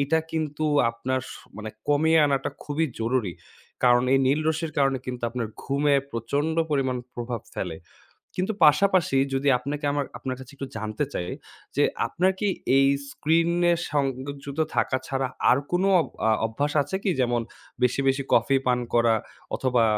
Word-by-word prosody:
এইটা 150 +4 +2
কিন্তু 155 -1 -2 0.3
আপনার 130 +3 -2
স - - -7 0.2
মানে 110 0 -6 0.2
কমিয়ে 160 +3 +4
আনাটা 135 -1 0
খুবই 155 +2 0
জরুরি। 115 -5 0 0.5
কারণ 120 0 +5
এই 135 - +5
নীল 145 +4 +3
রশ্মির 160 0 -1
কারণে 135 -1 +2
কিন্তু 125 -1 -5
আপনার 120 -3 -3
ঘুমে 140 +1 +2 0.2
প্রচণ্ড 140 +8 -1
পরিমাণ 130 -3 +1 0.2
প্রভাব 120 -2 -4
ফেলে। - - -3 0.6
কিন্তু 190 +4 -1
পাশাপাশি 170 -1 +4 0.2
যদি 135 +2 0
আপনাকে 145 +3 -4
আমার 145 -1 -1
আপনার 130 -1 -4
কাছে 130 +1 -11
একটু 135 -1 -6
জানতে 110 +5 -2
চাই? 90 - -3 0.5
যে - - +3 0.2
আপনার 185 +2 +2
কি 210 - +1 0.3
এই 135 0 +5 0.2
স্ক্রিনে 170 +3 +2 0.2
সংযুক্ত 140 +1 -2
থাকা 130 - +2
ছাড়া 135 -1 -1 0.2
আর 125 - +6
কোনো 185 +2 +2 0.4
আ - - +4 0.2
অভ্যাস 145 +6 -2
আছে 190 - -4
কি? 195 - +1
যেমন 120 -1 +1 0.4
বেশি, 125 +2 +2
বেশি 135 +1 +2
কফি 135 - +4
পান 125 -1 +3
করা? 115 -1 +4 0.4
অথবা 125 -3 +2
135 Hz, 155 wpm, -25 LUFS, 125-155 Hz, 0.6 s, আর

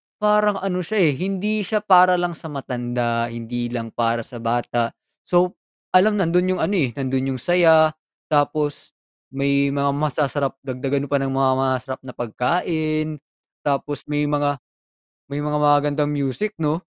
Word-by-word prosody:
parang 210 -1 +3
ano 185 -2 -1
siya, 190 +2 +1
eh, 155 - +4
hindi 195 +3 -1
siya 210 +1 -1
para 185 -2 +6
lang 175 0 0
sa 160 0 -9
matanda, 120 -4 -2
hindi 120 +1 -4
lang 115 -2 -5
para 115 0 0
sa 120 0 -10
bata. 120 0 -1 0.3
So, 180 0 +2 0.3
alam 210 +3 +5
nandun 180 0 +2
yung - - -3
ano, - - 0
eh, 125 -6 0
nandun 135 0 -1
yung 125 - -7
saya, 160 -3 +5 0.4
tapos, 145 0 0 0.3
may 140 +1 +1
mga 140 0 +1
masasarap, 145 -2 -1
dagdagan 135 +2 -2
pa 140 - +3
ng 135 - -1
mga 135 0 +2
ma 130 - -1 0.2
masasarap 130 +1 -7
na 130 -1 -10
pagkain, 155 +5 -1 0.4
tapos 145 0 -2
may 150 0 0
mga 145 -1 +1 0.7
may 140 +1 -4
mga 150 0 0
magagandang 145 0 +3
music 145 +9 -2
'no? 155 +1 -1
145 Hz, 155 wpm, -22 LUFS, 130-175 Hz, 0.7 s, para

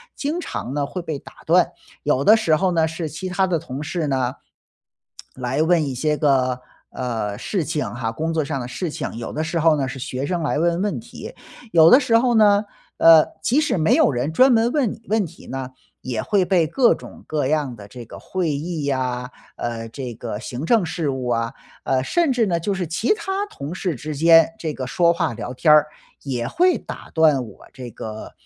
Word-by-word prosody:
经 305 +5 -2
常 135 - -5
呢 145 -1 -1
会 180 +5 -5
被 155 -4 -5
打 - - -14
断。 - - +4 0.3
有 135 - +1
的 220 +7 +7
时 200 -8 +2
候 185 +3 +1
呢， 165 -2 +2
是 160 0 -4
其 170 +5 -6
他 185 +1 +1
的 175 -3 0
同 140 -2 -6
事 160 0 -2
呢， 130 -2 -1 1.0
来 130 +4 -1
问 165 -2 +3
一 135 -3 -4
些 150 +2 0
个， 130 -4 +1 0.3
呃， 110 -5 -3
事 185 - -2
情 150 0 -2
哈， 120 -2 -3
工 160 +7 -2
作 160 -2 0
上 140 -2 -3
的 120 - -5
事 170 +7 -4
情。 145 - -5
有 115 - -6
的 155 - -2
时 160 +2 -2
候 160 -1 +4
呢 135 -2 -1
是 135 +1 -6
学 130 +1 -4
生 175 0 -2
来 150 0 0
问 170 +1 +1
问 205 +2 -1
题。 240 - -10 0.4
有 165 -1 +7
的 255 - +9
时 230 -5 +3
候 240 0 +3
呢， 210 -1 +5 0.3
呃， 165 -1 +7 0.2
即 260 - +2
使 310 - 0
没 160 -2 +3
有 - - +4
人 125 +4 -2
专 255 +11 +5
门 235 0 +3
问 280 -8 +1
你 220 - -9
问 220 -3 +2
题 165 +1 -14
呢， 130 -1 -5 0.3
也 115 -4 -3
会 195 -3 +1
被 175 -4 +3
各 240 - +3
种 - - -12
各 150 -3 -1
样 145 -4 -1
的 100 -2 -11
这 120 +2 -11
个 - - -10
会 180 -4 -2
议 150 0 -3
啊， 125 -2 -2 0.3
呃， 115 -1 -4
这 125 -2 -6
个 110 -2 -5
行 125 +4 -6
政 215 0 +3
事 155 -1 -2
务 130 -2 -4
啊， 115 0 0 0.3
呃， 130 -1 +1
甚 325 - +1
至 235 -3 +2
呢， 175 -3 0
就 185 +5 -2
是 190 -2 -2
其 175 - 0
他 390 -1 -3
同 145 +5 -7
事 185 -3 -2
之 150 +3 -6
间 165 +3 +6
这 160 -5 -3
个 130 -3 -5
说 170 +6 +3
话 145 -8 -1
聊 120 - -6
天 150 +4 +4
儿， 150 0 +5 0.3
也 125 -4 -3
会 360 +1 +2
打 - - -9
断 150 -6 +3
我 105 - -15
这 125 -2 -8
个 110 -1 -8
155 Hz, 235 characters per minute, -21 LUFS, 130-180 Hz, 1.0 s, 的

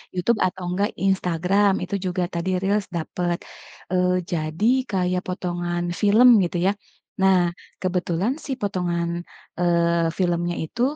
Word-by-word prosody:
YouTube 205 +5 +1
atau 185 0 -7
enggak 200 +4 0 0.2
Instagram 190 +2 +2
itu 200 - -3
juga 180 0 -1
tadi 170 +2 -2
reels 200 +1 0
dapat, 175 +1 -2 0.5
eee, 180 0 +2 0.2
jadi 155 +4 -2 0.3
kayak 180 -1 0
potongan 175 -1 -2 0.2
film 215 +4 +6 0.2
gitu 175 - -3
ya. - - +4 0.5
Nah 190 -1 +5 0.4
kebetulan 180 +4 0
sih 270 -3 -2
potongan, 175 -4 -1 0.5
eee, 170 -1 +2
filmnya 175 -1 0
itu 235 +10 -6
180 Hz, 125 wpm, -23 LUFS, 175-195 Hz, 0.5 s, film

